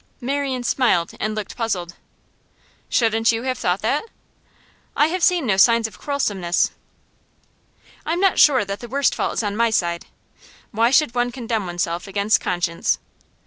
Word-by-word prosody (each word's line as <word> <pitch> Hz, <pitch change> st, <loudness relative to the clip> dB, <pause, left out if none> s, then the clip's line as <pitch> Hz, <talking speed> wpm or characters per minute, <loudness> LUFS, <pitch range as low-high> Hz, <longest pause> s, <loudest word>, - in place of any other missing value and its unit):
Marian 270 Hz, -1 st, -2 dB
smiled 235 Hz, -9 st, +1 dB
and 215 Hz, 0 st, -2 dB
looked 215 Hz, -2 st, -5 dB
puzzled. 185 Hz, -7 st, -3 dB, 1.0 s
'Shouldn't 225 Hz, -1 st, +2 dB
you 225 Hz, +1 st, -3 dB
have 255 Hz, -1 st, -2 dB
thought 180 Hz, +3 st, -1 dB
that?' 280 Hz, -, 0 dB, 0.9 s
'I 295 Hz, -, +4 dB
have 365 Hz, +2 st, -2 dB
seen 350 Hz, -4 st, +3 dB
no 200 Hz, -5 st, +1 dB
signs 230 Hz, +3 st, +5 dB
of 220 Hz, -, -7 dB
quarrelsomeness.' 200 Hz, -12 st, 0 dB, 1.3 s
'I'm 335 Hz, +3 st, -1 dB
not 390 Hz, -1 st, +2 dB
sure 260 Hz, -8 st, +5 dB
that 200 Hz, +1 st, -5 dB
the 240 Hz, -, -8 dB
worst 275 Hz, +3 st, +1 dB
fault -, -, -2 dB
is -, -, -1 dB
on 205 Hz, -1 st, -2 dB
my 230 Hz, +1 st, +2 dB
side. 170 Hz, -5 st, -1 dB, 0.6 s
Why 230 Hz, +2 st, +2 dB
should 275 Hz, -2 st, +3 dB
one 245 Hz, 0 st, 0 dB
condemn 230 Hz, -5 st, -3 dB
oneself 175 Hz, +1 st, -3 dB
against 200 Hz, +2 st, +1 dB
conscience? 175 Hz, -1 st, -1 dB
225 Hz, 155 wpm, -21 LUFS, 195-260 Hz, 1.3 s, signs